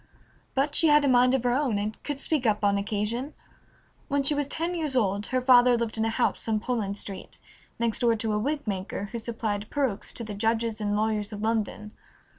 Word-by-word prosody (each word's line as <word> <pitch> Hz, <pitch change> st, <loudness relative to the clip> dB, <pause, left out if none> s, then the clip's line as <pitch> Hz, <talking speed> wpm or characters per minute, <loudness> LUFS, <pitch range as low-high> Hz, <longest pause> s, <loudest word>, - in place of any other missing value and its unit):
But 280 Hz, +2 st, +1 dB
she 325 Hz, -, +5 dB
had 295 Hz, -1 st, +5 dB
a -, -, +3 dB
mind 250 Hz, 0 st, +4 dB
of 260 Hz, -, -1 dB
her 245 Hz, -, +2 dB
own 260 Hz, -5 st, +1 dB
and 210 Hz, +1 st, -4 dB
could 290 Hz, -2 st, -4 dB
speak 280 Hz, -4 st, 0 dB
up 210 Hz, -1 st, +1 dB
on 200 Hz, 0 st, +3 dB
occasion. 215 Hz, +7 st, -3 dB, 0.7 s
When 280 Hz, 0 st, 0 dB
she 275 Hz, -, +3 dB
was 290 Hz, -1 st, -1 dB
ten 330 Hz, +4 st, -2 dB
years 310 Hz, -6 st, -2 dB
old 205 Hz, -3 st, +1 dB
her 255 Hz, -1 st, -1 dB
father 250 Hz, -1 st, +6 dB
lived 230 Hz, -1 st, -2 dB
in 220 Hz, 0 st, 0 dB
a -, -, +1 dB
house 235 Hz, +1 st, 0 dB
on 220 Hz, -1 st, +1 dB
Poland 215 Hz, -4 st, -2 dB
Street, 195 Hz, -2 st, -7 dB, 0.4 s
next 230 Hz, -1 st, 0 dB
door 235 Hz, -2 st, +3 dB
to 220 Hz, -1 st, -2 dB
a 210 Hz, -, +1 dB
wig 290 Hz, +6 st, -2 dB
maker, 200 Hz, 0 st, -4 dB
who 235 Hz, -, -4 dB
supplied 220 Hz, -2 st, -3 dB
perukes 265 Hz, -9 st, -2 dB
to 235 Hz, -, -5 dB
the 215 Hz, -2 st, -6 dB
judges 225 Hz, +1 st, -1 dB
and 205 Hz, 0 st, 0 dB
lawyers 215 Hz, 0 st, 0 dB
of 210 Hz, 0 st, -6 dB
London. 215 Hz, -1 st, -2 dB
230 Hz, 220 wpm, -27 LUFS, 210-260 Hz, 0.7 s, father